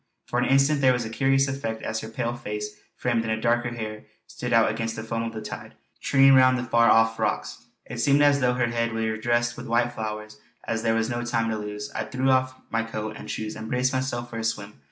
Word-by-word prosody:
For 120 - -1
an 125 - +1
instant 135 +2 +4
there 130 -1 +5
was 120 -2 -2
a 110 - -6
curious 135 +2 +2
effect 135 -5 -4
as 110 - -2
her 110 - -7
pale 120 +1 -2
face 105 -2 -5 0.2
framed 120 -2 0
in 110 -1 -1
dark 120 +1 +1
hair 110 -3 -5 0.2
stood 125 - -6
out 115 -2 +4
against 115 0 -3
the 110 - -5
foam 115 0 -3
of 115 0 -3
the 110 -1 -6
tide - - -8 0.2
churning 135 0 +5
round 130 -1 +6
the 120 - -2
far 115 -2 +4
off 115 0 +4
rocks. - - -2 0.2
It - - -7
seemed 145 +1 +4
as 145 -1 +5
though 125 -2 +2
her 125 -1 +2
head 115 0 -1
were 110 -1 -1
dressed 120 +1 0
with 120 +1 -7
white 120 +1 +1
flowers. 110 -1 -6 0.2
As 115 -1 -2
there 115 0 +1
was 115 +1 0
no 120 0 -2
time 115 -1 0
to - - -1
lose, 105 0 -6
I - - -3
threw 130 0 0
off 130 0 +2 0.2
my 115 - +1
coat 110 -1 -5
and - - -9
shoes 110 0 -4
and 110 +1 -7
braced 125 +1 +1
myself 130 -2 -2
for 115 - -4
a - - -3
swim. 105 -2 -2
115 Hz, 245 wpm, -25 LUFS, 110-125 Hz, 0.2 s, round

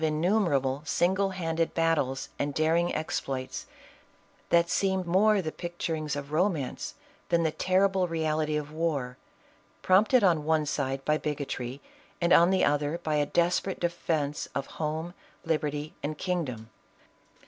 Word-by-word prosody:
innumerable 155 -4 +1
single 190 +5 +1
handed 165 -3 -2
battles 155 -5 +1
and 145 0 -2
daring 165 +2 +2
exploits, 135 -4 -3 0.8
that 170 0 +4
seem 190 +1 0
more 195 +3 +3
the 155 - -3
picturings 160 -4 -3
of 145 0 -6
romance 160 -5 -1 0.3
than 170 -1 +3
the 160 - +1
ter 185 +5 +3
rible 190 -2 -1
reality 155 -2 0
of 150 0 -5
war, 150 -6 -2 0.7
prompted 210 +6 +5
on 170 -5 +3
one 155 0 +2
side 135 -2 -2
by 155 0 +2
bigotry 140 -3 -4 0.4
and 170 0 +3
on 170 +1 +7
the 190 0 +3
other 145 +2 +1
by 155 - -1
a 145 -1 +2
desperate 175 +4 +1
defence 160 -4 -1
of 140 - -1
home, 160 +4 -4 0.3
lib 160 -2 +1
erty 150 0 -3
and 150 +1 -3
kingdom. 140 - -3
160 Hz, 140 wpm, -28 LUFS, 145-175 Hz, 0.8 s, on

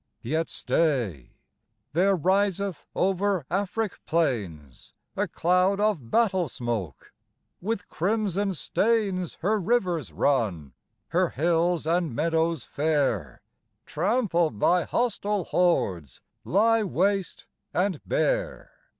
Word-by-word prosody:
Yet 160 +7 -1
stay 120 - -1 0.6
there 190 +4 +3
riseth 190 0 0
over 190 -3 +1
Afric 200 +2 -2
plains 100 - -2 0.2
A - - 0
cloud 180 +3 +2
of 205 - 0
battle 190 - +2
smoke; 115 - -5 0.5
with 200 0 -3
crimson 200 +1 0
stains 200 -2 0
Her 210 +5 +1
rivers 185 -6 0
run; 100 - 0 0.4
her - - +2
hills 170 +2 +1
and 165 -5 0
meadows 160 -1 0
fair, 140 - -1 0.4
Trampled 175 - 0
by 175 +10 +3
hostile 210 -4 -1
hordes, 95 - 0 0.2
lie 225 +4 +3
waste 195 0 -1 0.3
and 185 -3 0
bare. - - -1
175 Hz, 100 wpm, -26 LUFS, 145-200 Hz, 0.6 s, there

